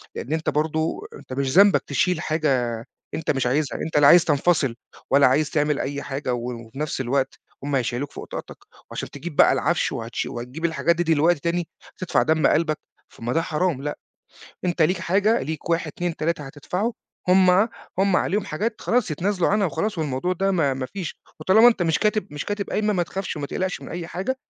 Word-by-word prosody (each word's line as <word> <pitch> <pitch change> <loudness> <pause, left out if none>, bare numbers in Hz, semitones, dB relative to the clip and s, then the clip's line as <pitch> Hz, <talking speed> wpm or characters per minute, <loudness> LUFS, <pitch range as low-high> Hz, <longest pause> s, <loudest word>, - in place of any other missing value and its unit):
لأن 145 - -4
أنت 160 0 0
برضه 160 - -1
أنت 130 - -10
مش 135 0 -1
ذنبك 200 0 +6
تشيل 180 -3 +1
حاجة 130 -8 0 0.3
أنت 160 - -1
مش 135 -3 0
عايزها، 140 -1 0
أنت 160 - -1
لا 145 -1 +7
عايز 175 +2 +7
تنفصل 145 -4 +2 0.4
ولا 140 0 +6
عايز 150 +4 +2
تعمل 150 -1 +1
أي 140 +1 -3
حاجة، 135 -2 -3
وفي 120 +1 -6
نفس 150 -3 -2
الوقت 135 +1 -1 0.2
هم 145 0 -1
هيشيّلوك 125 +2 -1
فوق - - -8
طاقتك، - - -7 0.3
وعلشان - - -5
تجيب 175 -4 -7
بقى - - +6
العفش - - +1
وهتش 115 +1 -3
وهتجيب 125 +8 -5
الحاجات 170 +1 +2
دي 175 - 0
دلوقتي 165 0 +3
تاني، 170 +1 -1 0.3
تدفع 185 - +1
دم 160 0 +3
قلبك 155 -2 +2 0.4
طَب - - -12
ما 120 - -1
ده 165 - +2
حرام، 160 -3 -1
لأ، 150 0 -4 0.7
أنت 175 -2 0
ليك 180 +5 +3
حاجة، 205 +6 +2
ليك 160 +2 -5
1 165 0 +1
2 175 +2 -3
3 160 -1 -1
هتدفعه، 180 - -3 0.4
هم 185 0 +6 0.5
هم 195 -1 +3
عليهم 200 +3 +1
حاجات 215 +8 -3
خلاص 230 -8 +1
يتنازلوا 180 +3 0
عنها 205 0 +2
وخلاص، 185 +4 -2
والموضوع 155 +4 -1
ده 195 +2 0
ما 155 -8 +2
ما 130 0 -3
فيش، 185 +2 -6 0.2
وطالما 220 +5 +6
أنت 225 -6 +3
مش 165 -1 +1
كاتب 215 0 +1
مش 145 - -5
كاتب 205 -1 -3
قايمة 210 0 +1
ما 175 -2 +1
تخافش، 190 +1 -5
وما 140 -1 -4
تقلقش 185 -1 -3
من - - -9
أي 170 0 -5
حاجة، 205 +11 -3
160 Hz, 195 wpm, -23 LUFS, 140-185 Hz, 0.7 s, لا